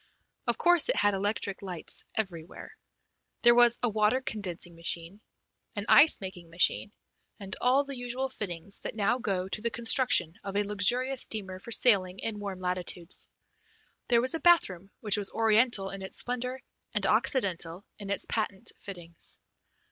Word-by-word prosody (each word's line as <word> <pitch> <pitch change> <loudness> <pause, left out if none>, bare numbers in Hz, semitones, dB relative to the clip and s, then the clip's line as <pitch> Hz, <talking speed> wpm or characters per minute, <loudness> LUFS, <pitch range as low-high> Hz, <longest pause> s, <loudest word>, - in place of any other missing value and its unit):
Of 240 -1 +1
course 350 +3 +4
it - - +3
had 205 0 +2
electric 200 0 -2
lights 180 -4 -3
everywhere. 175 -6 -6 0.7
There 240 0 +7
was 240 0 +5
a 240 - +2
water 215 +3 +2
condensing 185 -8 -5
machine, 170 +4 -3 0.5
an 205 -1 -4
ice 305 +2 +7
making 180 -3 -8
machine, 175 +4 +1 0.5
and 195 -2 -6
all 260 +3 +3
the 275 -1 -7
usual 245 +2 -3
fittings 200 -6 -5
that - - -7
now 215 +4 +1
go 190 -5 -2
to 210 - -3
the 235 - 0
construction 225 - +1
of 195 0 -4
a 205 - +2
luxurious 245 +6 +3
steamer 190 -4 -5
for 215 - -12
sailing 195 -6 +3
in 210 +1 -5
warm 200 -2 -6
latitudes. 180 -1 -3 0.8
There 235 -2 +3
was 255 +1 +3
a 325 - -2
bathroom 195 - +3
which 210 -3 +4
was 205 -2 -1
Oriental 220 -2 +2
in 195 0 -8
its 190 - -2
splendour 250 +1 -4 0.3
and - - 0
Occidental 185 - +1
in 200 -1 -8
its 200 - +1
patent 215 0 -2
fittings. 175 -4 -5
205 Hz, 160 wpm, -28 LUFS, 185-240 Hz, 0.8 s, There